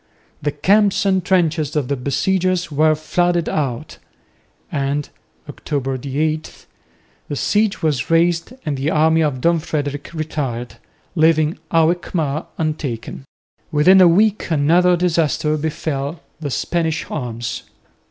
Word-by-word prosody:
The 145 - 0
camps 200 +7 +2
and 190 -2 +2
trenches 165 -5 +1
of 145 -4 0
the 140 - 0
besiegers 180 +6 0
were 155 +2 +3
flooded 175 +2 0
out; 145 -1 -3 0.7
and 140 0 -1 0.4
(October 135 -3 -3
8) 155 +3 -3 0.6
the 145 - -2
siege 210 +6 0
was 145 -7 0
raised 165 +3 +2
and 145 -3 -2
the 135 +3 -1
army 160 +1 +3
of 145 -5 -1
Don 170 +2 +3
Frederick 145 -2 -4
retired, 145 -7 -4 0.4
leaving 160 -1 +2
Alkmaar 165 -2 0
untaken. 145 -5 -4 0.5
Within 180 +5 +6
a 180 - +8
week 205 +5 +2
another 170 +4 +3
disaster 165 -3 +1
befell 150 0 -3 0.2
the 150 -3 -4
Spanish 160 +3 -1
arms. 120 -4 -4
155 Hz, 120 wpm, -19 LUFS, 145-170 Hz, 0.7 s, a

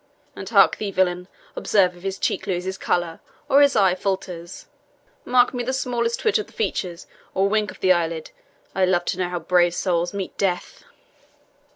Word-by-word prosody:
And - - -7
hark - - +5
thee, 210 - -3
villain, 180 -1 0 0.3
observe 185 -4 +2
if 175 - -15
his 195 0 -3
cheek - - -2
loses 185 0 -2
colour, 175 -3 -1 0.3
or 280 0 +5
his 285 -1 +4
eye 195 -4 +4
falters; 185 -2 -4 0.6
mark 250 +1 +3
me 245 -1 -2
the 260 +2 -2
smallest 240 -3 -1
twitch 440 -1 +2
of 430 - -5
the - - -20
features, 180 - -3 0.3
or 195 +1 +3
wink 210 +1 +1
of - - -11
the 185 - +4
eyelid. 165 -2 0 0.4
I 190 - +1
love 175 -1 +1
to 180 - -2
know 180 -1 0
how 180 - -3
brave 175 +1 +2
souls 175 -1 0
meet 200 -2 -5
death." 180 -3 -2
185 Hz, 185 wpm, -23 LUFS, 175-215 Hz, 0.6 s, hark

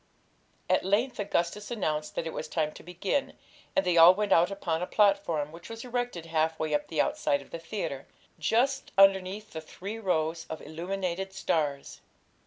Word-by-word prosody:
At - - +2
length 220 +6 +1
Augustus 205 0 -1
announced 155 -9 -2
that - - -2
it 160 - -4
was 155 - -4
time 155 -1 -1
to - - -12
begin, 185 - -2 0.4
and 285 - +2
they 175 -1 +2
all 170 +3 +9
went 210 0 -1
out 170 +2 +5
upon 175 -5 -2
a 180 - -2
platform, 195 -8 +2
which 170 +1 -11
was 225 +2 -7
erected 245 -8 -3
half 160 0 0
way 155 -1 -2
up 150 0 0
the 160 - -3
outside 140 - +1
of - - -22
the 170 - -5
theatre, 165 -6 -5 0.3
just 265 +4 +1
underneath 195 +2 +4
the 160 - -6
three 200 +7 -7
rows 165 -5 -1
of 160 - -5
illuminated 185 +3 -4
stars. 150 -7 -2
180 Hz, 180 wpm, -29 LUFS, 160-205 Hz, 0.4 s, all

